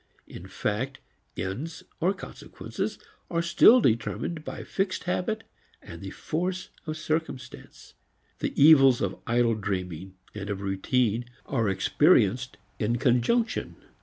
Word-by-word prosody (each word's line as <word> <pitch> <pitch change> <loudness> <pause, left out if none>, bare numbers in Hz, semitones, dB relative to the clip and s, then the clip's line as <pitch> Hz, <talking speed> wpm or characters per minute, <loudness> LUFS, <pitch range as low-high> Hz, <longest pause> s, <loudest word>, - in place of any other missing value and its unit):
In - - -10
fact 130 +7 -2 0.4
ends 140 - -4 0.2
or 175 +3 +2
consequences - - -6 0.3
are 170 -1 0
still 220 +8 +7
determined 150 - 0
by - - -6
fixed 190 -1 -2
habit 215 +5 -1 0.4
and - - -11
the - - -6
force 180 +3 -3 0.2
of 155 0 -3
circumstance. 155 -5 -5 0.5
The - - -3
evils 135 -4 +7
of 95 -1 -2
idle 120 0 +3
dreaming 95 -3 -4 0.2
and 100 -1 -6
of 100 -1 -3
routine 110 +4 0 0.2
are 115 -6 0
experienced 125 - +3 0.2
in 115 +2 +1
conjunction. 125 - +1
125 Hz, 120 wpm, -27 LUFS, 105-165 Hz, 0.5 s, still